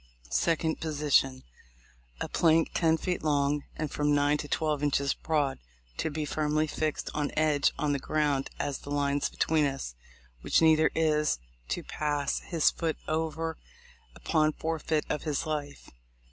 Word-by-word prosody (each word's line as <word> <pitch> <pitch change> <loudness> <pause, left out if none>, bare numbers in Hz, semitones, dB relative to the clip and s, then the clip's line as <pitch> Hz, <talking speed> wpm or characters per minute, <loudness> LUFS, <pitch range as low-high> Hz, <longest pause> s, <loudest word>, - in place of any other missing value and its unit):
2d. 160 -1 +1
Position:— 145 -4 +1 0.8
A - - -1
plank 165 -1 +3
ten 165 -2 +3
feet 180 +2 -2
long, 145 -1 +1
and 155 -2 -3
from 145 0 +1
nine 145 +1 +3
to 145 - -4
twelve 150 -1 0
inches 140 -1 +1
broad, 150 -4 -1 0.4
to - - -1
be 155 0 -3
firmly 155 +1 0
fixed 155 0 -2
on 150 -1 -1
edge 150 -2 +3
on 150 -1 0
the 140 - 0
ground 145 -1 0
as 140 -2 -2
the - - -11
lines 145 0 0
between 155 -2 +2
us, 135 - -4 0.5
which - - +3
neither 160 -1 +5
is 150 - +2 0.3
to - - -2
pass 145 -2 -1
his 165 -4 +2
foot 165 -2 -2
over 160 +1 -2 0.6
upon 155 -2 +1
forfeit 160 -1 -1
of 150 - -2
his 150 0 -2
life. 145 -2 -4
150 Hz, 150 wpm, -29 LUFS, 145-160 Hz, 0.8 s, neither